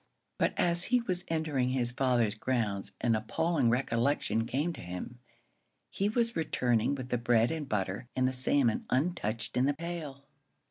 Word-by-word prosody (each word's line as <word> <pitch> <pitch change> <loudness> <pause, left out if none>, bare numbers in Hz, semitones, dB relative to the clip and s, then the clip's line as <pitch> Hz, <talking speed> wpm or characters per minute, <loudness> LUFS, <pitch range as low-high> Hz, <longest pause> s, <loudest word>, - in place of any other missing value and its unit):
But - - +1
as 175 0 +2
he 250 0 +3
was 185 -6 -1
entering 155 -6 0
his 125 -2 +1
father's 125 -4 +2
grounds 110 -4 -1
an 120 - +3
appalling 130 +5 +1
recollection 115 -1 +1
came 150 +8 -1
to - - -9
him. 90 +7 -7 0.7
He 200 +1 0
was 230 +1 0
returning 125 -5 +1
with 130 -2 -6
the 125 - 0
bread 120 +1 +3
and 155 -4 -4
butter 95 +2 -2
and 130 -1 +2
the 130 - -1
salmon 130 -2 +1
untouched 130 -6 -1
in 125 - +3
the 145 +1 +1
pail! 155 -4 -6
130 Hz, 165 wpm, -31 LUFS, 115-160 Hz, 0.7 s, he